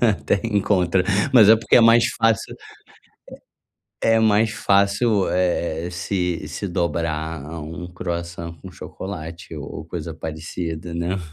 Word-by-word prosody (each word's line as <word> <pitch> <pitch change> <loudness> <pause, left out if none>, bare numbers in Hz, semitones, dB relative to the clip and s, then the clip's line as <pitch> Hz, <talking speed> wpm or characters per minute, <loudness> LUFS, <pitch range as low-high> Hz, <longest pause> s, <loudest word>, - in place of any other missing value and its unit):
até 105 -3 +1
encontra, 95 -4 +1 0.3
mas 110 -6 +7
é 110 - +8
porque 115 - +3
é - - +8
mais 115 +1 +6
fácil 115 -3 0
é - - -17 1.3
é 115 0 +3
mais 110 0 +3
fácil, 100 0 +2
eh 85 -2 0
eh, - - -5
se 90 0 -2
se 100 - -5
dobrar 80 -3 -2
a 80 +2 -7
um 80 +3 -7
croissant 85 -1 -5
com - - -9
chocolate 85 -3 -8
o 75 - -6
ou 75 - -7
coisa 80 -1 -6
parecida, 80 +1 -6
né. 85 +3 -2
90 Hz, 145 wpm, -22 LUFS, 85-100 Hz, 1.3 s, é